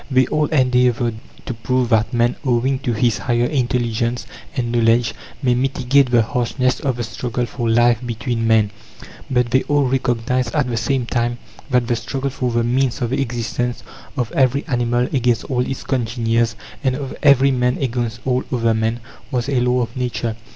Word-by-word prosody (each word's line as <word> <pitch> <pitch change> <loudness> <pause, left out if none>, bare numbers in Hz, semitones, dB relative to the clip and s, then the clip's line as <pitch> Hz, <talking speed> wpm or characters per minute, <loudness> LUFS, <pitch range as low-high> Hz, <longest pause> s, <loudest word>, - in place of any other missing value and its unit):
They 130 -1 +4
all 150 +4 0
endeavoured 125 -5 +2 0.3
to - - -3
prove 125 +2 0
that 110 -1 +2
Man, 120 -1 +2
owing 130 +1 +1
to 125 -3 -1
his 115 0 +1
higher 120 -1 +1
intelligence 120 -3 -1 0.3
and 120 -2 -1
knowledge, 115 0 +3 0.3
may 125 -2 +3
mitigate 130 +1 +2
the 120 -2 +4
harshness 125 +2 0
of 130 -3 -1
the 120 - -2
struggle 120 +2 -3
for 120 -1 -3
life 120 0 +4
between 115 -1 -2
men; 110 -2 +3 0.6
but 125 -2 +1
they 130 - +4
all 145 -1 +2
recognized 125 -1 0
at 145 -4 +2
the 120 - -2
same 120 +2 0
time 120 0 -1 0.3
that 125 -2 +2
the 120 0 0
struggle 135 +3 -3
for 125 -1 -2
the 120 0 +1
means 125 +2 +1
of 120 -1 -2
existence, 120 -1 -2 0.3
of 125 -4 -1
every 135 +1 +2
animal 120 -3 +1
against 125 -3 +1
all 125 - 0
its 130 +1 -3
congeners, 115 -2 0 0.3
and 130 -2 +1
of 135 -1 -5
every 140 -1 +5
man 125 -1 +1
against 120 -3 -2
all 130 0 +1
other 115 -3 +2
men, 110 +1 -1 0.3
was 125 -3 -1
"a 135 -3 +2
law 125 +1 +2
of 115 +1 -7
Nature." 120 -3 -2
125 Hz, 180 wpm, -20 LUFS, 115-130 Hz, 0.6 s, every